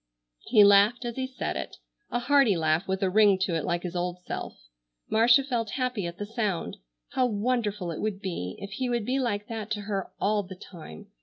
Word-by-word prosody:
He 210 - +6
laughed 205 +5 +5
as 235 -1 -4
he 260 0 -2
said 260 - -4
it, - - -5 0.3
a - - -1
hearty 245 -5 +3
laugh 160 +3 +1
with 190 +1 -1
a 190 - +2
ring 205 -1 +5
to 190 -2 +1
it 165 -2 -1
like 175 0 -1
his 180 -1 -5
old 175 0 -2
self. - - -6 0.5
Marcia 235 +5 +5
felt 240 -5 -2
happy 250 -8 -1
at 170 0 -7
the 205 - -4
sound. 210 -5 -2 0.3
How 255 -1 +1
wonderful 210 -4 -1
it 160 - -5
would 210 -3 -2
be 170 - -4
if 200 - -8
he 250 +5 -2
would 240 -3 -1
be 260 +3 0
like 210 -5 -1
that 220 -2 -5
to 210 - -4
her 200 -2 -3
all 210 0 +2
the 190 -1 -10
time! 165 - -11
205 Hz, 215 wpm, -27 LUFS, 185-240 Hz, 0.5 s, He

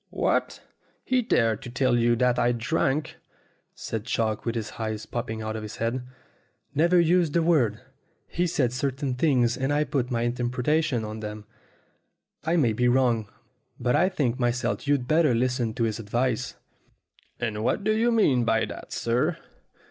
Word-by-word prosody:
"What! - - -1 0.4
He 255 -1 +2
dared 115 - +1
to - - -8
tell 125 0 +1
you 120 0 +3
that 125 +1 +2
I 120 +1 +3
drank?" 135 +4 -1 0.6
said 110 -2 -4
Chalk, 110 -2 -1
with 115 - -1
his 110 -3 -3
eyes 110 -1 -3
popping 110 -1 -4
out 110 0 -3
of 110 - -4
his 105 -1 -7
head. 125 +2 -2 0.7
"Never 170 +5 +4
used 170 -2 +3
the 170 - +2
word. 130 -11 +2 0.5
He 175 +1 -1
said 130 -7 0
certain 135 0 -2
things, 125 -3 +2
and 135 +1 -1
I 145 +1 +2
put 130 -4 -1
my 120 -2 -1
interpretation 125 +2 0
on 110 +1 -6
them. 105 0 -7 1.0
I 165 - +1
may 125 -10 +3
be 125 +3 +1
wrong; 120 -4 +2 0.5
but 125 0 +1
I 185 +3 +3
think 135 -9 -1
myself 120 +3 -1
you'd 140 -4 +1
better 155 -4 +3
listen 120 -2 0
to 120 - 0
his 110 -2 -1
advice." 120 +2 -1 0.8
"And 110 -3 -2
what 160 - 0
do 215 +1 +2
you 235 +2 +2
mean 145 - +3
by 115 -1 +2
that, - - -9
sir 120 +1 0
125 Hz, 170 wpm, -26 LUFS, 115-145 Hz, 1.0 s, Never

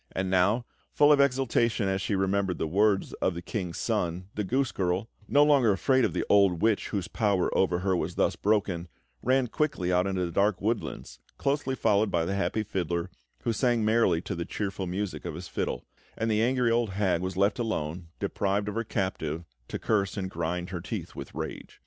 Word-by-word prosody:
And 95 0 -1
now, 100 +6 +3 0.3
full 145 0 +5
of 145 - +5
exultation 125 -5 +2
as 95 0 0
she 100 - 0
remembered 95 -1 0
the - - -1
words 100 +4 +2
of 95 - +1
the 85 - -5
King's 90 -3 -4
Son, 90 +2 -1
the 105 - -2
goose 130 +6 0
girl, 90 +2 -1 0.2
no 145 - +5
longer 140 -7 +5
afraid 130 +7 +2
of - - +1
the - - -1
old 100 -4 +4
witch, 110 -2 +2
whose 100 -4 -3
power 100 -5 +1
over 90 -2 +2
her 95 0 +1
was - - -2
thus - - +2
broken, 95 -5 0 0.3
ran 130 +1 +3
quickly 115 - -1
out 90 +2 +3
into 95 -2 0
the 85 - -4
dark 100 +1 +2
woodlands, 105 - -3 0.2
closely 140 -1 0
followed 110 -3 +2
by 85 -1 +1
the 95 - -1
happy 100 +2 0
fiddler, 90 -3 -2 0.3
who 115 - +1
sang 120 0 +2
merrily 110 -7 +3
to 100 - -4
the 85 -2 -3
cheerful 95 0 -3
music 95 +2 -3
of - - -5
his 90 +2 -7
fiddle; - - -3 0.3
and 115 0 0
the 105 0 +2
angry 125 0 +2
old 115 -1 +2
hag 95 -4 +1
was 95 0 -3
left 100 +3 +2
alone, 85 -7 -2
deprived 100 +1 -1
of - - -4
her 115 +2 -1
captive, 85 -6 -3 0.2
to - - -4
curse 100 -2 0
and 95 -1 -3
grind 85 +2 -3
her 85 -3 -4
teeth - - -5
with - - -8
rage. - - -6
100 Hz, 205 wpm, -28 LUFS, 90-115 Hz, 0.3 s, full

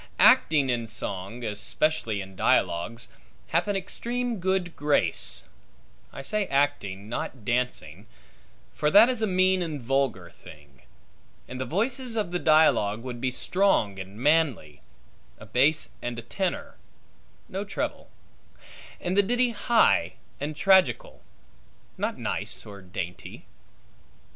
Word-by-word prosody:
Acting 145 -5 +5
in 120 -2 -2
song, 100 +2 -5
especially 110 +1 -1
in 95 0 -10
dialogues, 110 +7 0 0.4
hath - - +1
an 205 - 0
extreme 235 +4 -3
good 185 -1 -1
grace; 145 - +1 0.7
I 135 - -8
say 210 +5 0
acting, 120 -9 -1
not 120 0 -5
dancing 115 -7 -2 0.7
(for 150 - +1
that 210 +8 +7
is 250 -3 0
a 220 - +2
mean 185 0 +3
and 160 -4 -3
vulgar 125 -8 -1
thing); 70 -4 -16 0.7
and 130 0 -6
the - - -2
voices 235 - -1
of 205 -6 -1
the 180 - -1
dialogue 120 -10 +3
would 125 -2 -6
be 130 - +1
strong 125 - +1
and 95 +2 -9
manly 135 - +1 0.6
(a 110 - -12
base 135 +8 +2
and 120 -1 -4
a 120 - -6
tenor; 185 - -3 0.7
no 195 -2 -4
treble); 205 - -4 0.9
and 180 +1 -2
the 200 - +6
ditty 245 +4 +1
high 225 - +3 0.3
and 150 +2 -4
tragical; 185 -8 +3 0.7
not - - -3
nice - - -3
or 100 -1 -10
dainty. 90 -1 -7
135 Hz, 130 wpm, -26 LUFS, -, 0.9 s, that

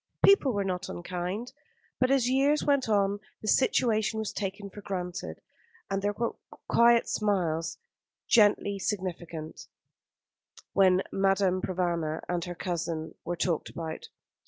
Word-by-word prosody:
People 395 -9 +6
were 205 -3 0
not 180 -1 -3
unkind; 180 +7 -4 0.5
but 255 - +3
as 270 -3 +3
years 275 +4 +3
went 280 -5 +2
on 200 -1 +2 0.2
the - - -5
situation 220 -2 +2
was 220 -1 -3
taken 200 0 -4
for 205 +1 -11
granted, 185 -1 -5 0.5
and 195 0 0
there 205 +1 0
were 230 +3 -2 0.3
quiet 235 0 +5
smiles, 175 -6 0 0.5
gently 205 -2 +4
significant, 170 -5 -4 1.1
when 190 -1 +4
Madame 195 -1 +2
Provana 170 -4 -1
and 175 -1 -1
her 175 -1 -6
cousin 165 -3 -3
were 175 - -2
talked 170 -2 -1
about. 160 -1 -6
195 Hz, 130 wpm, -28 LUFS, 175-215 Hz, 1.1 s, People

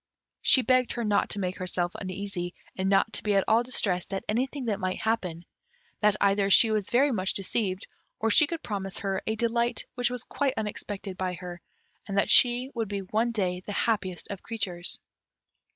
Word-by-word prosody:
She 260 - +6
begged 255 -1 +2
her 240 - -3
not 210 -2 +1
to 205 - -3
make 185 -1 -2
herself 180 -1 0
uneasy, 185 -2 -4 0.2
and 190 0 -1
not 200 +3 +3
to - - +1
be 210 -1 0
at 195 - +4
all 225 +2 +4
distressed 200 -8 0
at 195 - -3
anything 255 +5 -1
that 215 -3 -1
might 185 -1 -2
happen 180 -7 -2 0.5
that 210 -1 +3
either 200 0 +2
she 220 +3 +7
was 210 -2 0
very 275 +4 +3
much 190 -5 0
deceived, 195 -1 -1 0.3
or 225 0 +1
she 300 +7 +6
could 330 +1 -5
promise 195 -3 -3
her 195 -1 -2
a 220 - 0
delight 235 +1 0
which 245 -1 0
was 250 -2 -3
quite 275 -2 -1
unexpected 205 -2 -5
by 185 -1 -1
her, 175 0 -8 0.5
and 200 -1 -3
that 200 - +2
she 250 +2 +5
would 225 -3 -2
be 200 0 -4
one 220 +5 0
day 185 -5 -1
the 205 - -6
happiest 195 -5 -1
of 200 - -6
creatures. 185 -6 -4
205 Hz, 195 wpm, -27 LUFS, 185-235 Hz, 0.5 s, she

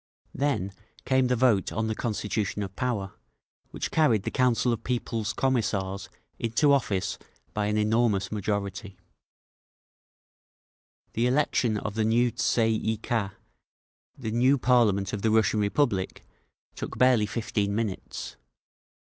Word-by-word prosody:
Then 130 -9 -1 0.3
came 130 -1 +3
the 125 - +2
vote 115 -6 +2
on 110 +1 -1
the 110 - -1
Constitution 105 -2 -2
of 95 -1 -7
Power, 110 -6 -2 0.6
which - - -4
carried 120 -11 +3
the - - -3
Council 125 -2 +2
of 115 - -5
People's 115 -3 -2
Commissars 100 -8 -1 0.3
into 130 +6 +3
office 100 -8 0 0.3
by 105 -1 0
an 105 0 0
enormous 105 -2 +1
majority…. 100 -1 -3 2.2
The 115 +2 +1
election 125 -4 +1
of 105 0 -4
the 110 +1 0
new 120 +2 +3
Tsay 115 -1 +1
ee 110 0 -1
kah, 105 -3 -2 0.8
the 110 -5 -4
new 130 +5 +3
parliament 110 -7 +2
of 105 - -3
the 110 - +2
Russian 110 0 +3
Republic, 100 -2 0 0.5
took - - -6
barely 125 -4 +4
fifteen 105 -2 -1
minutes. 110 -4 -4
110 Hz, 130 wpm, -27 LUFS, 100-125 Hz, 2.2 s, barely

